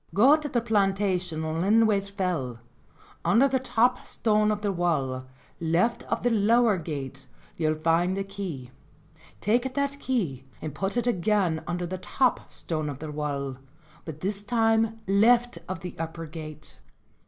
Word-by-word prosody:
"Go 260 +9 +7
to 305 -1 -4
the 240 -2 +1
plantation 195 -6 0
on 160 +1 -2
Linthwaite 205 0 +3
Fell; 175 - -2 0.6
under 245 +6 +5
the 265 -1 +1
top 250 0 +2
stone 215 -1 +2
of 210 0 -1
the 205 - +1
wall, 140 -8 -1 0.3
left 170 +8 +1
of - - 0
the 245 - +2
lower 225 -1 +4
gate, 140 -4 -6 0.3
you'll 155 -1 +1
find 165 +4 +1
a 195 - -1
key; 185 -11 -6 0.7
take 245 +5 +1
that 280 0 -1
key 180 - -1 0.2
and 155 - -5
put 195 +8 -2
it 240 - +1
again 195 -6 +1
under 175 0 -2
the 185 +1 -5
top 255 +6 0
stone 155 -3 -3
of 140 - -5
the 155 +1 -6
wall, 140 -3 -3 0.5
but 155 -2 -8
this 200 +1 -2
time 225 0 +2
left 235 +5 +3
of 185 -3 -4
the 180 -2 -6
upper 165 0 -4
gate." 155 -1 -9
195 Hz, 155 wpm, -27 LUFS, 160-225 Hz, 0.7 s, Go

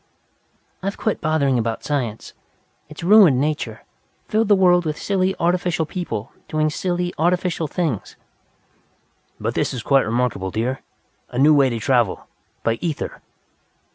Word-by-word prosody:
"I've 195 +1 -3
quit 220 - -1
bothering 145 -5 +1
about 115 -1 -2
science. 125 -7 -3 0.6
It 155 - -12
has - - -8
ruined 190 -11 +7
nature, 150 +2 -2 0.4
filled 220 0 +1
the 205 - +6
world 180 -2 +4
with 155 -2 -3
silly, 190 -1 0
artificial 175 -1 +1
people, 155 - -5 0.2
doing 155 0 0
silly, 175 +1 -2
artificial 175 -1 +1
things." 150 - -3 1.2
"But - - -2
this - - -1
is 120 - -5
quite 135 -4 +3
remarkable, 115 -5 -1
dear. 120 +6 -2 0.5
A 125 - -7
new 145 +4 +6
way 140 -3 +4
to 120 - -3
travel 120 -3 +1 0.4
by 115 0 0
ether!" 160 -4 -4
155 Hz, 140 wpm, -21 LUFS, 125-180 Hz, 1.2 s, ruined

